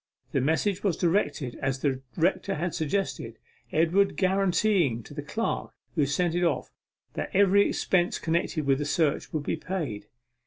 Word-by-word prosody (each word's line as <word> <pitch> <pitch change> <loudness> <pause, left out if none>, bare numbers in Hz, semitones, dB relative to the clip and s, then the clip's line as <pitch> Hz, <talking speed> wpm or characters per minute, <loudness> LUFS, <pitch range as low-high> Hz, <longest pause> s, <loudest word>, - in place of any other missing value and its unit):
The 135 - +1
message 180 +8 +1
was 195 -5 +1
directed 165 -8 0
as 135 0 0
the 135 -3 0 0.2
rector 185 +3 +1
had 175 +2 -2
suggested, 155 - -2 0.3
Edward 170 +5 +2
guaranteeing 190 - +2
to 145 - -12
the 145 - -4
clerk 220 +10 -2 0.2
who 150 -4 +2
sent 170 +4 +1
it 175 +1 +1
off 170 - 0 0.4
that - - -3
every 200 +1 +5
expense 175 -2 +1
connected 160 -2 -1
with 135 0 +3
the 145 - -1
search 150 0 0
would 155 -2 -2
be 160 - -1
paid. 160 - -4
165 Hz, 160 wpm, -27 LUFS, 145-190 Hz, 0.4 s, every